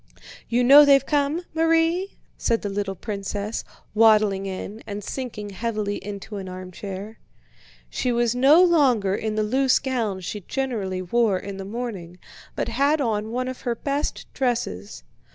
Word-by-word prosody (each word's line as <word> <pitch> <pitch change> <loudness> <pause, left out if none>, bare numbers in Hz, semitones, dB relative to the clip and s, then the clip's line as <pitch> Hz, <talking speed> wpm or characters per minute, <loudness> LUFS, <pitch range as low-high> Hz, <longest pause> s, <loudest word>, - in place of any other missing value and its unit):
"You 240 +1 +2
know 280 +4 +9
they've 275 -2 +5
come, 295 +3 0
Marie?" 330 +3 +1 0.2
said 230 -1 0
the 205 - -2
little 195 -1 -2
princess, 205 +1 -4 0.3
waddling 210 -3 +4
in, 195 +3 -6
and 205 0 -5
sinking 215 -6 -5
heavily 210 -1 -2
into 205 +1 -7
an 190 -1 -6
armchair. 190 +3 -8 0.7
She 250 - -1
was 240 -1 +1
no 280 +8 +6
longer 260 - +3
in 215 +1 -2
the 215 - +1
loose 260 +4 +3
gown 230 -8 -2
she 205 +3 -5
generally 200 -7 -3
wore 215 +1 +2
in 195 +1 -7
the 195 - -6
morning, 200 -6 -6 0.4
but - - -2
had 290 +3 +2
on 220 -5 -1
one 255 +2 -2
of 255 0 -6
her 240 -1 -1
best 280 +4 -3
dresses. 230 - -2
220 Hz, 150 wpm, -24 LUFS, 200-265 Hz, 0.7 s, know